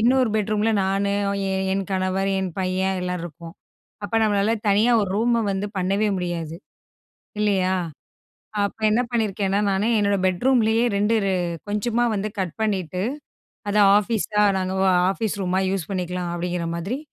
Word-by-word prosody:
இன்னொரு 250 +1 +3
பெட்ரூம்ல 215 +1 +1
நானு, 195 +1 0 0.4
என் 190 0 -1
என் 195 0 -1
கணவர், 190 +1 0
என் 190 -1 -2
பையன் 190 0 0
எல்லாம் 180 -1 -3
இருக்கோம். 170 +1 -10 0.5
அப்ப, 225 - -5
நம்மளால 210 +1 +2
தனியா 210 +4 +4
ஒரு 200 -3 -2
ரூம 230 +1 +2
வந்து 195 +1 -2
பண்ணவே 195 +3 +1
முடியாது. 170 -3 -4 0.9
இல்லையா. 190 -3 +2 0.9
அப்ப 200 +2 -3
என்ன 220 +3 +3
பண்ணியிருக்கேன்னா, 205 -3 0
நானு 195 +2 +1
என்னோட 200 -1 +2
பெட்ரூம்லயே, 225 +4 +2
2 210 +3 +2
ரெ 195 - +1 0.4
கொஞ்சமா 230 +3 0
வந்து 205 +1 -2
கட் 185 -4 -2
பண்ணிட்டு, 185 -4 -1 0.7
அத 210 - +1 0.2
ஆஃபீஸா, 210 -1 0 0.2
நாங்க 185 0 -2 0.2
ஆ - - +3 0.2
ஆஃபீஸ் 215 +1 -2
ரூமா 185 +1 0
யூஸ் 190 -4 -3
பண்ணிக்கலாம். 180 -2 -3
அப்டிங்கிற 175 -1 -3
மாதிரி 195 +11 -3
195 Hz, 145 wpm, -23 LUFS, 185-215 Hz, 0.9 s, தனியா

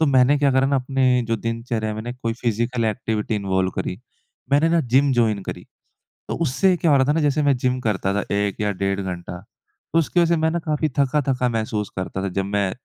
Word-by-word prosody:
तो 160 - +4
मैंने 135 +1 +4
क्या 140 -1 +3
करा 130 +1 +3
ना 140 0 +2
अपने 130 -1 +2
जो 115 0 0
दिनचर्या 115 -1 -3
में 110 - -5
ना 120 - -5
एक 125 - -8
कोई 115 - 0
फिज़िकल 115 +1 0
एक्टिविटी 110 0 -1
इन्वॉल्व 95 -2 0
करी। 90 - -3 0.6
मैंने 150 +3 +4
ना 170 0 +3
जिम 135 +2 +2
जॉइन 110 -5 +1
करी। - - -6 0.7
तो - - -2
उससे 175 +6 +2
क्या 165 -2 +1
हो 140 - +6
रहा 130 - +4
था - - +4
ना 165 - +1
जैसे 150 0 +1
मैं 140 -2 +3
जिम 125 +1 0
करता 100 -4 -1
था 100 - -1
1 100 0 -1
या 105 -1 +1
डेढ़ 95 +1 -1
घंटा, 90 -2 -5
तो 155 +9 -6
उसकी 170 +2 +2
वजह 170 - +3
से - - +1
मैं 160 - +2
ना 170 - -1
काफ़ी 155 -1 -1
थका-थका 135 -2 +1
महसूस 110 -2 -2
करता 95 0 -4
था 100 - -1
जब 95 +1 -2
मैं 100 -1 0
120 Hz, 235 wpm, -22 LUFS, 105-140 Hz, 0.7 s, हो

